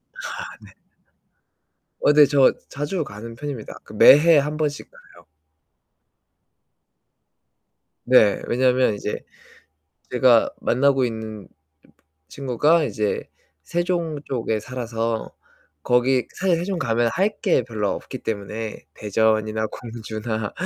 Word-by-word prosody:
아 - - -12 0.4
네. - - -15 1.3
어 145 - +4
네. 150 0 +8
저 140 -2 +4 0.2
자주 150 +5 -3
가는 115 -1 -9
편입니다. 135 -5 -7
그 - - -14
매해 150 +9 +7
1 150 +2 0
번씩 150 -2 -3
가요. - - -19 2.8
네. 120 -5 +4
왜냐면 125 -1 +2
이제 105 0 -4 0.9
제가 125 -2 +4
만나고 135 +1 +2
있는 110 -3 -6 0.8
친구가 140 - +1
이제 105 -6 -2 0.4
세종 170 - -2
쪽에 115 -4 -2
살아서 115 -2 -4 0.5
거기 125 0 +2
사실 180 -2 +1
세종 180 +2 -3
가면 120 -4 +1
할 195 +4 +1
게 190 - +2
별로 105 -4 -2
없기 - - -7
때문에 110 -1 -5
대전이나 110 +1 0
공주나 110 -2 -5
125 Hz, 200 characters per minute, -22 LUFS, 110-145 Hz, 2.8 s, 네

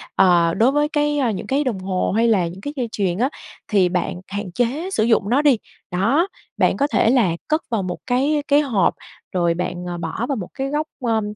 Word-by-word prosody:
ờ, 170 -2 +4
đối 230 +7 +3
với 295 +1 +2
cái 295 -1 +1
những 200 - -6
cái 275 +4 +1
đồng 240 -8 -2
hồ 185 0 -1
hay 230 +1 +3
là 195 -7 +3
những 180 +3 -9
cái 290 +7 -5
dây 250 -4 -2
chuyền 185 -5 -1
á, 250 +5 +1 0.4
thì 195 -4 +3
bạn 180 0 -2
hạn 200 -1 -5
chế 250 - -1
sử 220 - +1
dụng 220 -3 +2
nó 260 +5 +3
đi, 285 -5 +4 0.3
đó, 270 - +2 0.3
bạn - - +2
có 285 - +2
thể 260 - +2
là 235 -8 +3 0.2
cất 310 +1 +1
vào 225 -4 0
một 180 -1 -4
cái 280 +4 +1
cái 290 +1 +5
hộp, 230 -11 +1 0.4
rồi 170 -2 +1
bạn, 180 +1 -4
ờ, 175 -1 -4
bỏ 165 +7 -3
vào 280 - +1
một 190 -7 -5
cái 270 0 -3
góc, 300 +2 -1
ơ, 225 -3 +1
225 Hz, 225 wpm, -21 LUFS, 185-280 Hz, 0.4 s, cái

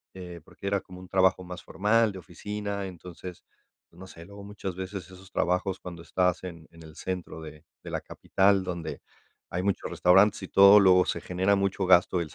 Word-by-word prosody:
eh, 90 -2 -9
porque - - -14
era 100 -1 0
como 90 0 -13
un 95 - -12
trabajo 95 0 +3
más 90 0 -8
formal, 110 +2 +2
de 95 - -8
oficina, 100 +3 -5
entonces, 90 0 -10 0.5
pues 85 - -20
no 95 - -10
sé, 85 -2 -12
luego 100 +1 -12
muchas 100 -3 -6
veces 95 +1 -6
esos 95 +1 -15
trabajos 90 +2 0
cuando 85 -2 -9
estás 90 +2 0
en 85 -3 -9
en 85 0 -16
el 80 -1 -13
centro 90 -3 -5
de 75 -1 -11 0.2
de - - -8
la - - -3
capital, 95 0 +1
donde 90 -3 -5 0.5
hay 90 - -2
muchos 100 -1 -1
restaurantes 95 +3 +4
y - - -5
todo, 100 +1 +8
luego 90 -2 +5
se - - -3
genera 95 +3 +1
mucho 100 0 -1
gasto 90 -1 +4
el 80 -2 -6
95 Hz, 200 wpm, -27 LUFS, 90-100 Hz, 0.5 s, todo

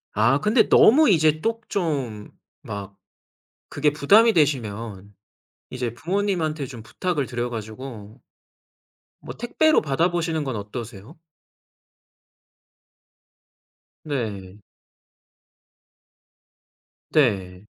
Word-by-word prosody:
아 120 +7 +3
근데 220 +5 +3
너무 290 +3 +6
이제 155 -3 +3
또 230 +1 -1
좀 135 - -3 0.3
막 100 -1 -7 0.7
그게 145 0 +1
부담이 210 +11 +5
되시면 110 - -1 0.6
이제 125 -2 -4
부모님한테 165 -4 -2
좀 120 -4 -10
부탁을 160 -1 -2
드려 120 0 -3
가지고 110 0 -8 1.0
뭐 - - -9
택배로 310 +7 +2
받아 160 +5 0
보시는 165 -3 -1
건 130 -4 -4
어떠세요? 110 - -8 2.8
네. 105 -9 -5 2.5
네. 100 -9 +1
135 Hz, 170 characters per minute, -23 LUFS, 110-165 Hz, 2.8 s, 너무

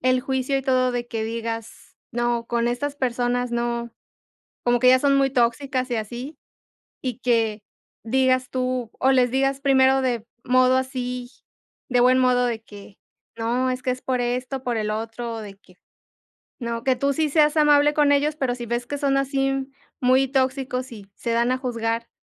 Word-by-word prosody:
el 255 0 +2
juicio 265 0 -1
y 270 - -1
todo 255 -1 +2
de 245 -1 -3
que 225 -2 -3
digas: 225 0 -6 0.2
"No, 240 0 -1
con 235 0 0
estas 275 +4 -2
personas 245 -1 -1
no", 235 0 -2 0.7
como 245 0 +2
que 250 - +2
ya 255 0 +6
son 280 0 +3
muy 275 -1 +3
tóxicas 255 +1 0
y 240 - 0
así. 240 +7 -6 0.6
Y 255 -2 -3
que 225 -4 0 0.4
digas 255 +1 +2
tú 255 -2 -2
o 265 - +4
les 250 -2 +3
digas 270 +1 +1
primero 265 -1 +4
de 240 -4 -1 0.2
modo 255 0 +4
así 250 -1 -3 0.6
de 250 -2 +1
buen 255 +1 +5
modo 250 -1 +3
de 230 -2 -3
que: 205 -1 -14 0.4
"No, 240 +3 0
es 255 0 -3
que 255 - 0
es 255 0 -3
por 255 -1 -1
esto, 250 +2 -2
por 245 -2 -1
el 215 -1 -1
otro, 225 +1 -4
de 205 -2 -9
que, 185 -2 -23 0.8
no", 235 -2 -4
que 260 -1 +2
tú 280 +2 +1
sí 310 +2 0
seas 300 0 +3
amable 295 -1 +5
con 295 -1 +3
ellos, 295 +2 +2
pero 255 -4 -1
si 240 -1 -7
ves 240 +1 -2
que 285 - -4
son 275 -1 +1
así 270 0 -1 0.3
muy 260 +1 +3
tóxicos 260 -1 -1
y 205 -3 -11
se 235 - -4
dan 235 +2 +2
a 255 - 0
juzgar, 230 -2 -2
250 Hz, 185 wpm, -23 LUFS, 235-265 Hz, 0.8 s, ya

